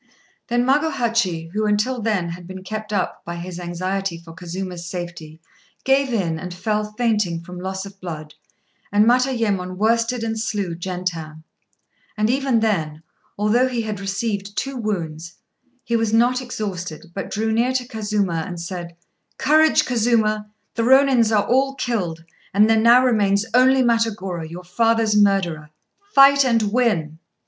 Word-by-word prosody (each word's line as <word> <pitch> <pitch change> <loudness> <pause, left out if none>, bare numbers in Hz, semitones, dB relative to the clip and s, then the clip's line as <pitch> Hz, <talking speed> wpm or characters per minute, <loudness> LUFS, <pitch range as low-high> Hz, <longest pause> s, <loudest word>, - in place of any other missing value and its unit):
Then 240 0 +1
Magohachi, 235 - 0
who 215 +1 0
until 215 +4 0
then 205 -6 0
had 170 +1 -8
been 185 0 -8
kept 215 +2 -6
up 195 -3 -2
by 170 - -6
his 175 +1 -7
anxiety 185 +1 -3
for 165 -1 -13
Kazuma's 180 +1 -6
safety, 170 -3 -7 0.4
gave 270 0 +2
in, 170 -8 -1
and 180 0 -7
fell 210 +2 -2
fainting 210 -7 0
from 180 +1 -9
loss 190 +1 -4
of 195 0 -13
blood; 155 -4 -7 0.6
and 205 +1 +4
Matayémon 230 -7 +1
worsted 230 +3 +1
and 225 -1 -2
slew 205 -5 -2
Gentan; 170 -3 -5 0.7
and 215 +2 +2
even 265 -3 +1
then, 160 -8 -1 0.3
although 225 +5 +2
be 240 -2 -1
had 215 -3 -4
received 200 0 -3
two 275 0 -2
wounds, 170 -8 -4 0.5
he 235 - -1
was 225 -2 +1
not 245 +3 +3
exhausted, 180 -9 -6
but 195 - -5
drew 220 +2 -1
near 235 +3 +2
to 255 -1 -1
Kazuma 205 -7 -1
and 175 -3 -6
said 170 -1 -6 0.4
"Courage, 310 +3 +4
Kazuma! 220 -3 +1 0.2
The 230 - -1
Rônins 260 -2 +4
are 210 -2 +3
all 270 +2 +2
killed, 180 -11 -2 0.3
and 210 +2 +6
there 225 - +4
now 240 +3 +6
remains 205 -4 +2
only 260 +1 +5
Matagorô, 210 -8 -1
your 175 +2 -8
father's 225 +3 +1
murderer. 190 -7 +2 0.5
Fight 280 0 +7
and 225 -5 +1
win!" 165 -11 0
210 Hz, 150 wpm, -21 LUFS, 180-235 Hz, 0.7 s, Fight